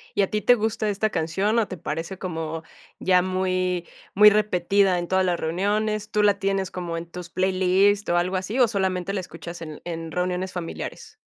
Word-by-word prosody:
¿Y 205 - +3
a 195 - +1
ti 210 - -1
te 245 +5 +5
gusta 220 -1 -1
esta 205 +2 0
canción, 195 +7 0
o 215 - +1
te 185 - -7
parece 165 +3 -4
como 165 -3 -4 0.4
ya 185 -1 +4
muy 185 -1 -1 0.3
muy 210 +2 +8
repetida 200 -2 +2
en 175 - -4
todas 190 +1 +2
las 175 -2 0
reuniones? 210 +5 -1
¿Tú 210 0 +2
la 205 -1 +3
tienes 195 -1 -1
como 175 -2 -4
en 165 - -5
tus 175 0 -8
playlist 190 +2 +2
o 175 - +3
algo 180 +2 0
así, 195 +7 -2
o 245 - +6
solamente 190 -3 -1
la 200 - -1
escuchas 175 -1 -9
en 155 -2 -8
en 165 -1 -5
reuniones 180 +2 -2
familiares? 435 - -6
185 Hz, 195 wpm, -24 LUFS, 175-205 Hz, 0.4 s, muy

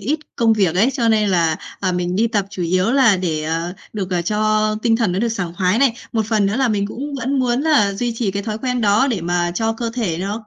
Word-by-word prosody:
ít 305 +3 -1 0.2
công 230 -1 +3
việc 195 -6 +1
ấy, 220 +9 +3
cho 235 -3 0
nên 215 -2 +2
là, 165 -4 +2 0.2
à, 185 -2 0
mình 180 0 -2
đi 225 +3 +3
tập 205 -3 -1
chủ 185 -3 -5
yếu 185 +6 +1
là 260 -7 +5
để, 165 -4 -2
ờ, 165 +3 -2 0.2
được, 195 -3 -4
ờ, 175 -2 0
cho 215 +2 +1
tinh 225 -1 +3
thần 225 -6 0
nó 185 - -1
được 235 +2 +1
sảng 180 -6 -4
khoái 185 +5 +1
này. 270 -4 +3 0.2
Một 220 -2 0
phần 215 -2 +1
nữa 200 +4 -1
là 265 -2 +2
mình 200 -2 0
cũng 280 +7 -6
vẫn 270 +1 -1
muốn 250 -1 +1
là 285 -10 +3
duy 235 +4 -2
trì 225 -4 -1
cái 200 +1 -3
thói 215 0 -4
quen 250 0 -2
đó 210 +5 +3
để 215 -7 -1
mà 175 +1 0
cho 225 +4 0
cơ 230 0 -4
thể 190 -10 -2
nó 205 +4 -4
215 Hz, 270 wpm, -19 LUFS, 185-235 Hz, 0.2 s, là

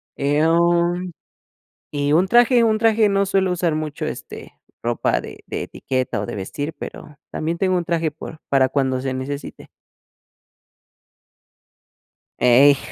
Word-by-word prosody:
em, 170 +4 +2 0.8
y 145 0 0
un 180 +4 +4
traje, 240 +2 +5
un 220 -1 +3
traje 220 -1 +3
no 200 0 +2
suelo 190 -1 +1
usar 170 -3 0
mucho, 155 -2 -4
este, - - -8 0.3
ropa 120 0 0
de - - -11
de - - -4
etiqueta 130 -6 -3
o - - -3
de - - -6
vestir, 145 +11 -5
pero 150 -1 -10
también 165 +2 -2
tengo 185 0 +1
un 175 - -2
traje 165 -3 0
por 160 +1 -10
para 135 -1 +3
cuando 130 -2 0
se 135 -1 -2
necesite. 140 +2 -6 2.7
Ey, 135 +3 +6
160 Hz, 135 wpm, -21 LUFS, 140-185 Hz, 2.7 s, Ey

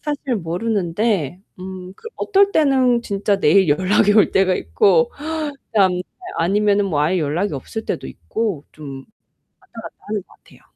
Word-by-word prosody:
사실 285 -4 -3
모르는데 185 - -1 0.2
음 185 0 -8
그 455 - -9
어떨 400 -1 +3
때는 260 -5 +3
진짜 200 -1 -1
내일 185 +2 +4
연락이 185 +6 +3
올 215 - +4
때가 190 -1 +3
있고 475 - +2 0.6
그다음 195 -4 +3
날 180 - -2 0.4
아니면은 205 +3 +2
뭐 155 -6 0
아예 170 +5 +1
연락이 160 +4 -1
없을 220 +11 -6
때도 - - -4
있고 210 -10 -4
좀 140 -3 -9
왔다 135 - -20 0.8
갔다 - - -28
하는 210 -1 -2
것 - - -49
같아요. - - -22
195 Hz, 305 characters per minute, -20 LUFS, 175-225 Hz, 0.8 s, 내일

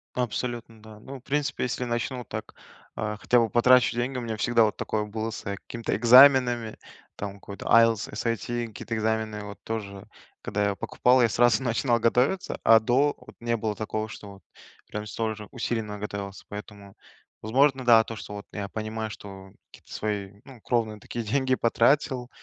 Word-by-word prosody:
Абсолютно, 120 -2 -3
да. 110 -1 -13
Ну, 135 +4 -9
в - - -27
принципе, 145 +1 -1
если 125 0 -2
начну 120 +1 -2
вот 120 - -10
так, - - -7 0.4
а, 105 0 -3
хотя 125 - +2
бы 115 -1 +1
потрачу 120 0 +4
деньги, 125 +2 -1
у - - -3
меня 115 -2 -4
всегда 115 +1 +3
вот 105 - 0
такое 110 -1 -2
было 110 +1 -4
с, 110 - -8
э, 100 0 -3
какими-то 115 +4 -5
экзаменами, 120 -1 +6 0.4
там 100 -1 -5
какой-то 100 0 -10
IELTS, 115 -2 +4
SAT 120 +1 -2
какие-то 115 +1 -6
экзамены 110 -1 -1
вот 100 0 -10
тоже, 100 -3 -5 0.3
когда 105 - -2
я 100 - -2
покупал, 125 +5 +2
я 120 - +5
сразу 115 0 +3
начинал 120 0 +1
готовиться, 125 +11 +1
а 115 0 +7
до- 130 +6 +2
вот - - -16
не 115 0 0
было 110 -1 -2
такого, 110 +1 -3
что 100 -2 -11 0.5
прям 105 0 -5
столь 110 +1 -3
же 105 -1 -10
усиленно 110 -4 -3
готовился. 100 -1 -6
Поэтому, 105 -1 -10 0.5
возможно, 135 +4 +2
да, 115 -2 +7
то 115 - -6
что 105 0 -8
вот 100 - -8
я 100 -2 -4
понимаю, 110 +1 -4
что 95 -2 -10 0.2
какие-то - - -18
свои, 105 -2 -3
ну, 130 -5 -14
кровные 110 -3 -1
такие 115 +2 -6
деньги 130 +3 +1
потратил, 125 +1 +1
115 Hz, 180 wpm, -26 LUFS, 105-120 Hz, 0.5 s, а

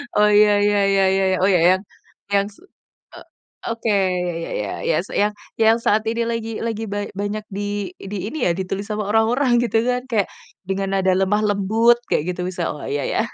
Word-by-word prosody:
oh 210 0 +5
ya 210 0 +5
ya 205 0 +3
ya 195 0 +3
ya 195 0 +2
ya, - - -3
oh 195 - +4
ya 175 - +4 0.2
yang 190 - -6 0.5
yang 200 0 +2
se 210 - -21 0.5
e - - -10 0.5
oke, 230 0 -3
ya 180 -3 +1
ya - - -6
ya 105 - -4 0.2
ya, 160 - +2 0.2
yang 210 +1 +2 0.3
yang 225 +1 +5
saat 215 +1 +3
ini 230 +1 0
lagi 225 -1 -3
lagi 225 -1 -3
ba 205 0 -3
banyak 205 +1 -3
di 205 -1 -3
di 200 +1 -6
ini 315 - -3
ya, 175 - +3
ditulis 190 +2 -3
sama 210 -1 -2
orang-orang 240 +4 +3
gitu 230 -2 0
kan, 250 0 0
kayak, 210 -4 +1 0.4
dengan 195 0 -1
nada 190 0 +2
lemah 195 +2 +2
lembut, 220 +4 +3 0.2
kayak 150 - +2
gitu 180 - -5
bisa, 180 -2 -3
oh 150 - -9
ya 145 0 -2
ya, - - -1
205 Hz, 200 wpm, -21 LUFS, 190-220 Hz, 0.5 s, oh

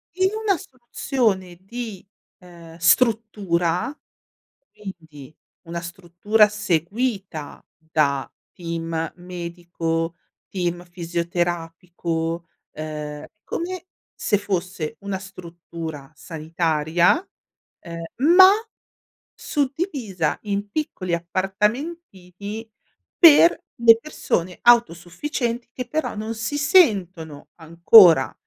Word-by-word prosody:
In 375 +1 +2
una 395 -4 +3
soluzione 235 - -2
di, 220 -1 -7 0.3
ehm, 170 -2 -14
struttura, 195 - +1 0.7
quindi 160 -8 -11 0.3
una 170 0 -4
struttura 185 +5 +1
seguita 195 - -3
da 155 -4 -1 0.2
team 165 -1 -4
medico, 170 -2 -4 0.3
team 175 -2 -3
fisioterapico, 170 -1 -3 0.2
ehm, 150 -1 -6 0.2
come 365 +1 -5 0.3
se 205 - 0
fosse 185 -5 -3
una 200 -1 -4
struttura 170 -6 -9
sanitaria, 165 - 0 0.6
ehm, 170 0 -8 0.3
ma 375 0 +10 0.8
suddivisa 270 - -2
in 205 0 -3
piccoli 200 - -3
appartamentini 200 - -3 0.5
per 335 0 +7 0.2
le 230 -1 +8
persone 185 - -3
autosufficienti 235 - +1
che 250 0 -6
però 315 0 -2
non 215 +2 -4
si 230 +6 -3
sentono 190 - +2
ancora 170 -1 +6
180 Hz, 80 wpm, -22 LUFS, 165-225 Hz, 0.8 s, ma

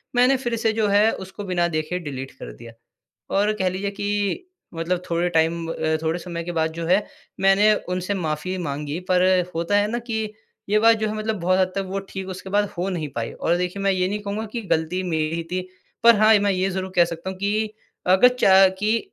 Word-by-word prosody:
मैंने 250 +2 +5
फिर 240 -2 -2
से 225 -1 +1
जो 220 -1 +1
है 205 +2 +4
उसको 190 +2 -7
बिना 175 -2 0
देखे 155 +2 -2
डिलीट 135 -4 -6
कर - - -7
दिया। 115 - -12 0.7
और 210 +2 +3
कह 185 - +2
लीजिए 195 +2 -3
कि 205 - -2 0.3
मतलब 170 +2 -2
थोड़े 170 +1 +1
टाइम 165 0 +1
ब - - -3
अ, 160 0 0
थोड़े 160 +2 0
समय 170 -1 -5
के 175 - -4
बाद 160 0 +1
जो 165 0 -4
है 195 +3 +3 0.3
मैंने 195 +2 +5 0.2
उनसे 180 +2 -2
माफी 180 +1 -3
माँगी, 150 -1 -4
पर 185 0 +1 0.3
होता 170 +5 +1
है 205 +1 +2
ना 240 - -1
कि 225 -2 -3 0.5
ये 215 +1 +4
बात 225 +1 +5
जो 215 0 -1
है - - -3
मतलब 215 -1 -2
बहुत 185 +2 +2
हद 185 0 +2
तक 195 - 0
वो 195 +1 -3
ठीक 190 -1 -6
उसके 185 +1 -7
बाद 205 0 +1
हो 180 +3 -1
नहीं 165 -5 -3
पाई। 115 -1 -3
और 170 +1 0
देखिए, 180 +2 -3
मैं 195 - +3
ये 185 -1 +1
नहीं 210 - -2
कहूँगा 205 +2 -3
कि 235 - -2
गलती 160 +4 -1
मेरी 160 -3 -1
ही 165 - -3
थी, 185 - -1 0.4
पर 235 -1 +8
हाँ, 215 +1 +6
मैं 200 0 +2
ये 185 +1 0
ज़रूर 190 0 -4
कह 175 - +6
सकता 170 +2 -6
हूँ 190 - -7
कि 210 +2 -1 0.3
अगर 190 +7 +6
च 190 -1 +6
कि 215 +2 +2
185 Hz, 230 wpm, -23 LUFS, 170-205 Hz, 0.7 s, पर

